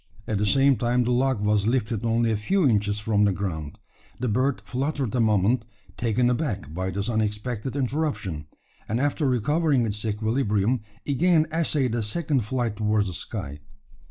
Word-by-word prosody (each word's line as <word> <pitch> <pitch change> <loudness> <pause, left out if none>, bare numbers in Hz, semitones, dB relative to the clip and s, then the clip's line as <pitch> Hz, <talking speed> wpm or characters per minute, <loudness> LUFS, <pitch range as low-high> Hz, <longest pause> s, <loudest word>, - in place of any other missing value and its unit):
At 105 -2 -1
the 105 - +1
same 135 +4 +4
time 120 +1 +1
the 120 - 0
log 130 -2 +1
was 105 0 +2
lifted 115 -2 0
only 115 0 +2
a - - +1
few 165 - +2
inches 105 -3 +1
from 105 -1 +1
the 100 - +4
ground. 85 -6 -4 0.4
The 125 - -1
bird 130 +5 +1
fluttered 135 -2 -2
a 125 - +1
moment, 110 +1 +3 0.3
taken 120 +2 +1
aback 120 - -2
by 95 +2 -2
this 100 +2 -3
unexpected 110 +2 -2
interruption; 130 - -2 0.4
and, 110 +3 0
after 145 +1 +1
recovering 140 +2 +2
its 105 -1 -3
equilibrium, 110 +1 0 0.2
again 155 +3 +3
essayed 150 -7 +1
a 120 - 0
second 135 +2 -1
flight 120 -2 -2
towards 105 -1 +1
the 95 - -4
sky. 70 -3 -6
115 Hz, 165 wpm, -25 LUFS, 105-130 Hz, 0.4 s, same